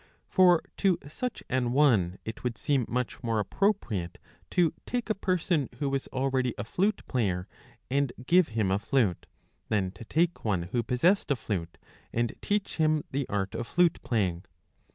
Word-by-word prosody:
For 180 Hz, -3 st, +5 dB
to 190 Hz, -4 st, +3 dB
such 250 Hz, -, -4 dB
an 125 Hz, -2 st, 0 dB
one 110 Hz, -11 st, +3 dB
it 110 Hz, -, -6 dB
would 120 Hz, -3 st, -2 dB
seem 135 Hz, -5 st, +1 dB
much 125 Hz, +3 st, -2 dB
more 115 Hz, -2 st, 0 dB
appropriate 105 Hz, -, 0 dB, 0.3 s
to 175 Hz, -4 st, +2 dB
take 245 Hz, -3 st, -1 dB
a -, -, +4 dB
person 180 Hz, -, 0 dB
who 140 Hz, -, -1 dB
was 135 Hz, -1 st, -1 dB
already 130 Hz, -2 st, 0 dB
a -, -, -3 dB
flute 195 Hz, -, 0 dB
player 95 Hz, -7 st, 0 dB, 0.4 s
and 140 Hz, 0 st, +1 dB
give 180 Hz, +4 st, +5 dB
him 100 Hz, -4 st, +2 dB
a 95 Hz, -, +2 dB
.flute, 105 Hz, -, 0 dB, 0.4 s
than 95 Hz, -4 st, +1 dB
to 95 Hz, +4 st, -11 dB
take 165 Hz, +8 st, 0 dB
one 95 Hz, -6 st, 0 dB
who 120 Hz, +8 st, -1 dB
possessed 125 Hz, -, +2 dB
a 140 Hz, -, +3 dB
flute 90 Hz, -8 st, -4 dB, 0.3 s
and 120 Hz, -1 st, 0 dB
teach 205 Hz, -1 st, -1 dB
him 155 Hz, -2 st, +2 dB
the 135 Hz, -1 st, -2 dB
art 100 Hz, 0 st, -1 dB
of 115 Hz, +1 st, -4 dB
flute 175 Hz, -1 st, +2 dB
playing. 95 Hz, -7 st, 0 dB
125 Hz, 170 wpm, -28 LUFS, 105-165 Hz, 0.4 s, For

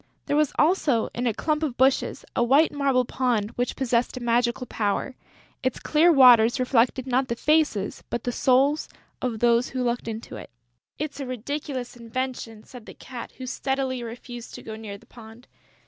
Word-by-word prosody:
There 290 Hz, -, 0 dB
was 300 Hz, -2 st, +2 dB
also, 295 Hz, -8 st, +2 dB
in 245 Hz, +1 st, -2 dB
a 230 Hz, -, +1 dB
clump 305 Hz, -1 st, -1 dB
of 285 Hz, -6 st, -2 dB
bushes, 265 Hz, +1 st, +1 dB
a 240 Hz, -, +2 dB
white 275 Hz, +7 st, +4 dB
marble 275 Hz, -3 st, +1 dB
pond 235 Hz, -5 st, -1 dB
which 245 Hz, +1 st, -2 dB
possessed 250 Hz, -1 st, 0 dB
a -, -, -3 dB
magic 240 Hz, 0 st, +1 dB
power: 220 Hz, +5 st, -2 dB, 0.5 s
its 260 Hz, -2 st, -1 dB
clear 320 Hz, +3 st, +4 dB
waters 245 Hz, -5 st, +7 dB
reflected 255 Hz, 0 st, +2 dB
not 260 Hz, 0 st, +1 dB
the 235 Hz, -, -2 dB
faces, 300 Hz, -8 st, +1 dB
but 235 Hz, -, -3 dB
the 245 Hz, -, -1 dB
souls 270 Hz, +5 st, +2 dB, 0.3 s
of 245 Hz, -3 st, -2 dB
those 235 Hz, +2 st, +3 dB
who 255 Hz, -1 st, -2 dB
looked 240 Hz, -1 st, -2 dB
into 225 Hz, 0 st, -6 dB
it. -, -, -10 dB, 0.5 s
"It's 295 Hz, -1 st, -5 dB
a 275 Hz, -, -4 dB
ridiculous 255 Hz, +1 st, -5 dB
invention," 235 Hz, -2 st, -5 dB
said 245 Hz, -4 st, -13 dB
the -, -, -10 dB
Cat, 250 Hz, -3 st, -9 dB
who 260 Hz, -, -8 dB
steadily 265 Hz, 0 st, -2 dB
refused 240 Hz, +1 st, -8 dB
to -, -, -10 dB
go 220 Hz, -, -7 dB
near 215 Hz, -2 st, -8 dB
the -, -, -21 dB
pond. 230 Hz, +1 st, -14 dB
250 Hz, 180 wpm, -25 LUFS, 235-270 Hz, 0.5 s, waters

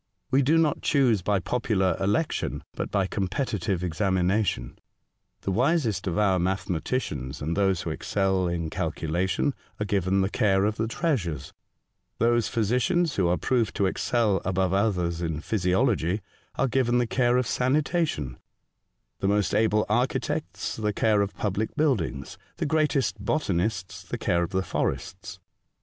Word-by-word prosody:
We 135 Hz, -, +4 dB
do 150 Hz, +5 st, +3 dB
not 160 Hz, -3 st, +2 dB
choose 125 Hz, -8 st, +3 dB
by 100 Hz, +3 st, +1 dB
popular 100 Hz, -4 st, 0 dB
election, 105 Hz, +11 st, -1 dB
but -, -, -4 dB
by 100 Hz, -2 st, +1 dB
competitive 100 Hz, -1 st, -2 dB
examina 95 Hz, +3 st, +1 dB
tion. -, -, -4 dB, 0.6 s
The 95 Hz, -, -2 dB
wisest 120 Hz, -, +1 dB
of 85 Hz, -, -1 dB
our 95 Hz, -3 st, +3 dB
mathematicians, 85 Hz, -, -2 dB
and 80 Hz, +3 st, -2 dB
those 95 Hz, -3 st, +1 dB
who 80 Hz, -, -3 dB
excel 95 Hz, +2 st, 0 dB
in 85 Hz, -2 st, -2 dB
calculation, 85 Hz, -, -1 dB, 0.3 s
are 105 Hz, -, -1 dB
given 95 Hz, -1 st, +1 dB
the 95 Hz, -, +1 dB
care 95 Hz, -2 st, +2 dB
of 105 Hz, +1 st, -1 dB
the 115 Hz, -, 0 dB
treasures; 100 Hz, -, -2 dB, 0.6 s
those 120 Hz, 0 st, +2 dB
physicians 130 Hz, -, +1 dB
who 95 Hz, -3 st, +3 dB
are 90 Hz, +1 st, +2 dB
proved 120 Hz, -4 st, 0 dB
to 100 Hz, -, +2 dB
excel 105 Hz, 0 st, +1 dB
above 95 Hz, 0 st, 0 dB
others 90 Hz, -5 st, 0 dB
in 80 Hz, -3 st, -2 dB
physiology 95 Hz, +1 st, +1 dB, 0.3 s
are 135 Hz, -, +1 dB
given 125 Hz, -1 st, +2 dB
the 120 Hz, -, +2 dB
care 120 Hz, +1 st, +2 dB
of 125 Hz, -, +1 dB
sanitation; 130 Hz, -, 0 dB, 0.8 s
the 95 Hz, -, 0 dB
most 100 Hz, -3 st, +1 dB
able 105 Hz, -1 st, +3 dB
architects 120 Hz, +5 st, -1 dB
the 105 Hz, -1 st, -1 dB
care 105 Hz, 0 st, +3 dB
of 100 Hz, 0 st, -3 dB
public 105 Hz, +1 st, -2 dB
buildings; 105 Hz, -, -1 dB, 0.2 s
the -, -, -1 dB
greatest 140 Hz, -, +1 dB
botanists 100 Hz, -, -1 dB
the -, -, -5 dB
care 85 Hz, -, +1 dB
of 85 Hz, -, -1 dB
the 95 Hz, 0 st, 0 dB
forests. 95 Hz, 0 st, -3 dB
100 Hz, 150 wpm, -26 LUFS, 90-120 Hz, 0.8 s, We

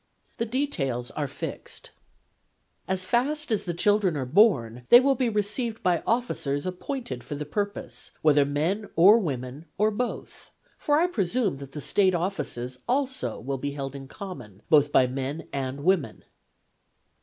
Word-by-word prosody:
The 230 Hz, -, -1 dB
details 150 Hz, -, -2 dB
are 145 Hz, -2 st, -3 dB
fixed: -, -, -7 dB, 0.5 s
' -, -, -45 dB
As 185 Hz, -1 st, 0 dB
fast 280 Hz, +6 st, 0 dB
as 215 Hz, -, 0 dB
the 175 Hz, -, -2 dB
children 200 Hz, -3 st, +2 dB
are 135 Hz, -, -2 dB
born 125 Hz, -, +3 dB
they 240 Hz, -, +10 dB
will 275 Hz, +2 st, +3 dB
be 255 Hz, -2 st, 0 dB
received 215 Hz, +2 st, -1 dB
by 180 Hz, -3 st, +2 dB
officers 150 Hz, -, 0 dB
appointed 185 Hz, -, -5 dB
for 145 Hz, -, -6 dB
the 150 Hz, +1 st, -5 dB
purpose, 205 Hz, +6 st, -4 dB
whether 150 Hz, -2 st, +5 dB
men 160 Hz, +9 st, -1 dB
or 200 Hz, +7 st, +7 dB
women, 135 Hz, -, -4 dB
or 215 Hz, +2 st, +3 dB
both: 245 Hz, +4 st, -5 dB, 0.3 s
for 295 Hz, 0 st, +1 dB
I 340 Hz, -, +4 dB
presume 210 Hz, -, 0 dB
that 140 Hz, 0 st, -10 dB
the 150 Hz, -, -5 dB
State 190 Hz, +3 st, +2 dB
offices 130 Hz, -9 st, -3 dB
also 260 Hz, -, -1 dB
will 135 Hz, +2 st, -4 dB
be 140 Hz, +1 st, -3 dB
held 140 Hz, -1 st, -5 dB
in 135 Hz, -1 st, -8 dB
common 125 Hz, -, -9 dB
both 145 Hz, -2 st, +5 dB
by 130 Hz, -, +5 dB
men 135 Hz, +4 st, -4 dB
and 135 Hz, +1 st, -3 dB
women.' 165 Hz, -, +1 dB
175 Hz, 160 wpm, -26 LUFS, 135-215 Hz, 0.5 s, they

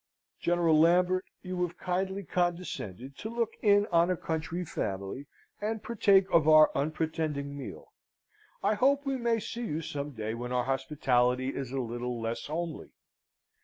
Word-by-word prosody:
General 170 Hz, -3 st, +3 dB
Lambert, 180 Hz, +3 st, +4 dB, 0.2 s
you 180 Hz, -1 st, -3 dB
have 175 Hz, 0 st, -2 dB
kindly 190 Hz, +2 st, -2 dB
condescended 170 Hz, -, -3 dB
to 220 Hz, -, -5 dB
look 230 Hz, -1 st, -1 dB
in 205 Hz, -1 st, +5 dB
on 170 Hz, +1 st, +4 dB
a 180 Hz, -, +1 dB
country 165 Hz, +3 st, -3 dB
family, 100 Hz, -, -4 dB, 0.3 s
and 215 Hz, +1 st, -2 dB
partake 200 Hz, -4 st, +4 dB
of 160 Hz, -2 st, +4 dB
our 155 Hz, -1 st, +8 dB
unpretending 150 Hz, -1 st, -2 dB
meal. 140 Hz, -2 st, -9 dB, 0.7 s
I -, -, +3 dB
hope 275 Hz, +6 st, +2 dB
we 270 Hz, -1 st, 0 dB
may 235 Hz, -2 st, +1 dB
see 235 Hz, +2 st, -5 dB
you 155 Hz, +2 st, -2 dB
some 145 Hz, 0 st, -4 dB
day 110 Hz, -1 st, -4 dB
when 120 Hz, +1 st, -5 dB
our 125 Hz, -1 st, +1 dB
hospitality 130 Hz, -1 st, +1 dB
is 135 Hz, -2 st, -4 dB
a 135 Hz, -, -2 dB
little 120 Hz, 0 st, -3 dB
less 115 Hz, +1 st, -3 dB
homely. 165 Hz, +2 st, -4 dB
160 Hz, 155 wpm, -30 LUFS, 135-185 Hz, 0.7 s, our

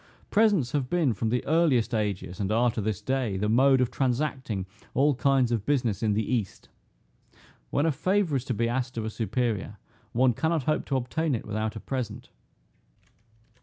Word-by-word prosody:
Presents 205 Hz, -, +3 dB
have 135 Hz, -4 st, -1 dB
been, 160 Hz, -8 st, +2 dB
from 110 Hz, +2 st, -2 dB
the 125 Hz, +2 st, -1 dB
earliest 140 Hz, -8 st, +2 dB
ages, 100 Hz, -5 st, -2 dB
and 100 Hz, 0 st, -1 dB
are 120 Hz, +2 st, +3 dB
to 110 Hz, -, -3 dB
this 105 Hz, -2 st, -3 dB
day, 130 Hz, -7 st, -1 dB
the 105 Hz, +2 st, 0 dB
mode 130 Hz, +4 st, +4 dB
of 125 Hz, -1 st, +1 dB
transacting 130 Hz, -6 st, -1 dB, 0.3 s
all 145 Hz, +2 st, +4 dB
kinds 130 Hz, -2 st, +2 dB
of 115 Hz, -4 st, 0 dB
business 120 Hz, -7 st, 0 dB
in 110 Hz, -2 st, +2 dB
the 110 Hz, +1 st, 0 dB
east. 115 Hz, -7 st, -3 dB, 1.0 s
When 145 Hz, -, +1 dB
a 165 Hz, -, +3 dB
favor 180 Hz, +2 st, +1 dB
is 130 Hz, -1 st, -1 dB
to 125 Hz, -, -2 dB
be 115 Hz, +2 st, +1 dB
asked 125 Hz, +1 st, -2 dB
of 110 Hz, -, -2 dB
a 110 Hz, -, -3 dB
superior, 110 Hz, -3 st, -2 dB, 0.3 s
one 125 Hz, +1 st, +3 dB
cannot 160 Hz, +4 st, 0 dB
hope 155 Hz, +4 st, 0 dB
to 135 Hz, -, -1 dB
obtain 135 Hz, +4 st, -1 dB
it 115 Hz, -, -5 dB
without 110 Hz, +1 st, -3 dB
a -, -, -5 dB
present. 125 Hz, -5 st, -5 dB
125 Hz, 185 wpm, -27 LUFS, 110-140 Hz, 1.0 s, mode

